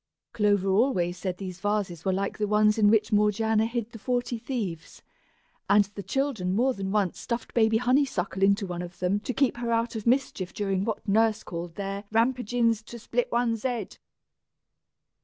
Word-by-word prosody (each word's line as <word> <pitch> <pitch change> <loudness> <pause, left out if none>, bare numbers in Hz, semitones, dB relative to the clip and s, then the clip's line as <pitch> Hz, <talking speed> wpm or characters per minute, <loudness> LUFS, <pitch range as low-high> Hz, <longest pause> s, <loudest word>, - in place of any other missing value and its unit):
Clover 205 -3 +2
always 190 -4 +2
said 185 -2 -3
these 185 -2 -7
vases 205 -5 -2
were 190 - +1
like 195 +2 -2
the 210 - 0
ones 210 +1 +3
in 205 -1 +5
which 220 +1 +3
Morgiana 215 +1 +2
hid 235 -1 -4
the 225 - -10
Forty 245 0 -1
Thieves, 210 - -5 0.7
and 205 0 +5
the 200 - -6
children 220 -2 -1
had 185 - 0
more 255 +4 +2
than 195 -3 -4
once 200 -4 0
stuffed 235 -1 -4
baby 220 -1 +3
Honeysuckle 245 -7 0
into 200 +1 +3
one 175 -2 -4
of 175 0 -8
them 185 +3 0
to 220 - -4
keep 265 -1 +1
her 240 -1 -2
out 230 +1 0
of 220 0 -5
mischief 235 -7 0
during 195 -2 -1
what 225 0 -4
Nurse 220 +1 +2
called 170 0 -6
their 200 +1 -4
"rampagin's 230 -1 +1
to 235 +2 -10
split 235 +1 -2
one's 235 -2 0
head." 240 -5 -3
215 Hz, 180 wpm, -27 LUFS, 195-235 Hz, 0.7 s, in